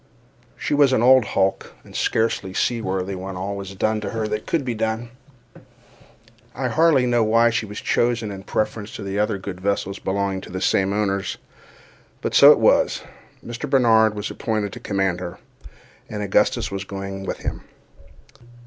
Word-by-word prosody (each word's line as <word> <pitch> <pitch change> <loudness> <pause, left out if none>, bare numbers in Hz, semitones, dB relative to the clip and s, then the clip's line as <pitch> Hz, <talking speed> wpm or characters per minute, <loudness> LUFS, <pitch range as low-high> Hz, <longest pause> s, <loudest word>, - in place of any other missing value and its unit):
She - - -2
was 145 -2 +4
an 120 - +2
old 130 0 +7
hulk, 95 -1 -1
and - - -15
scarcely 105 -4 0
seaworthy 95 -5 -1
when 95 +1 -6
all 100 +2 -3
was 100 -1 -7
done 110 +2 0
to - - -4
her 110 -1 -2
that 105 0 -4
could 155 -5 0
be 125 - -1
done. 110 +1 -2 1.5
I 130 -2 -1
hardly 155 -2 +4
know 120 -2 +2
why 115 +2 +4
she 110 -1 -1
was 105 - -7
chosen 120 -3 0
in 95 -1 -7
preference 110 0 -2
to 100 -1 -4
other 105 -1 +1
good 95 -1 -7
vessels 100 0 -1
belonging 95 0 -2
to - - -11
the 95 - -4
same 95 +1 +2
owners—but 100 -2 -5
so - - +9
it - - +5
was. - - +3 0.4
Mr. 120 +5 -5
Barnard 110 -5 +4
was 105 +1 -4
appointed 105 -3 -2
to - - -8
command 95 -3 -1
her, 90 -1 -6 0.7
and 105 -1 -4
Augustus 100 - +1
was 95 -1 -3
going 95 0 -6
with - - -4
him. - - -4
105 Hz, 165 wpm, -22 LUFS, 95-115 Hz, 1.5 s, so